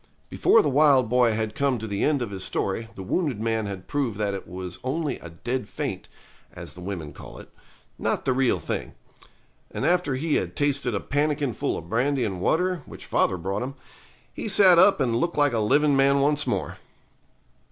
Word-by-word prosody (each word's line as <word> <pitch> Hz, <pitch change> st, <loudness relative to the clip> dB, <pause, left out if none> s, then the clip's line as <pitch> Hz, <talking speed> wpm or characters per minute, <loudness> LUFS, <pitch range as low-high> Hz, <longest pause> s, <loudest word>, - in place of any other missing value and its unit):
Before 225 Hz, -, +4 dB
the -, -, 0 dB
wild 140 Hz, -4 st, +4 dB
boy 125 Hz, -2 st, +3 dB
had 110 Hz, 0 st, -2 dB
come 140 Hz, +1 st, 0 dB
to 110 Hz, -, -6 dB
the 100 Hz, -2 st, -2 dB
end 145 Hz, -4 st, +2 dB
of 110 Hz, -, -6 dB
his 95 Hz, -1 st, -3 dB
story 105 Hz, +4 st, -2 dB
the 95 Hz, -, -7 dB
wounded 140 Hz, -, -1 dB
man 110 Hz, -1 st, -1 dB
had 95 Hz, -2 st, -7 dB
proved 135 Hz, -8 st, -2 dB
that 105 Hz, -2 st, -1 dB
it 100 Hz, -, -6 dB
was 90 Hz, +1 st, -7 dB
only 140 Hz, +1 st, -2 dB
a 85 Hz, -, -10 dB
dead 120 Hz, +8 st, -4 dB
faint, -, -, -4 dB, 0.5 s
as -, -, -8 dB
the 90 Hz, -, -11 dB
women 90 Hz, -5 st, -6 dB
call -, -, -11 dB
it, -, -, -12 dB, 0.5 s
not -, -, -1 dB
the 130 Hz, -, +2 dB
real 130 Hz, -1 st, +2 dB
thing. -, -, -4 dB, 0.8 s
And -, -, -4 dB
after 175 Hz, -6 st, +2 dB
he 150 Hz, +4 st, 0 dB
had -, -, -3 dB
tasted 140 Hz, -5 st, 0 dB
a -, -, 0 dB
pannikin 145 Hz, -1 st, -1 dB
full -, -, -2 dB
of 80 Hz, -, -8 dB
brandy 125 Hz, +5 st, 0 dB
and 95 Hz, -4 st, -4 dB
water, 180 Hz, -, +1 dB
which -, -, -9 dB
father 95 Hz, -, +1 dB
brought 95 Hz, +5 st, -3 dB
him, 130 Hz, +2 st, -5 dB, 0.6 s
he -, -, -5 dB
sat 190 Hz, -4 st, +6 dB
up 200 Hz, -, +6 dB
and 120 Hz, -4 st, +1 dB
looked 170 Hz, +2 st, -1 dB
like 145 Hz, -3 st, +3 dB
a 115 Hz, -, +1 dB
living 145 Hz, +7 st, +3 dB
man 140 Hz, +1 st, +4 dB
once 145 Hz, +1 st, +1 dB
more. -, -, -2 dB
130 Hz, 205 wpm, -25 LUFS, 105-145 Hz, 0.8 s, sat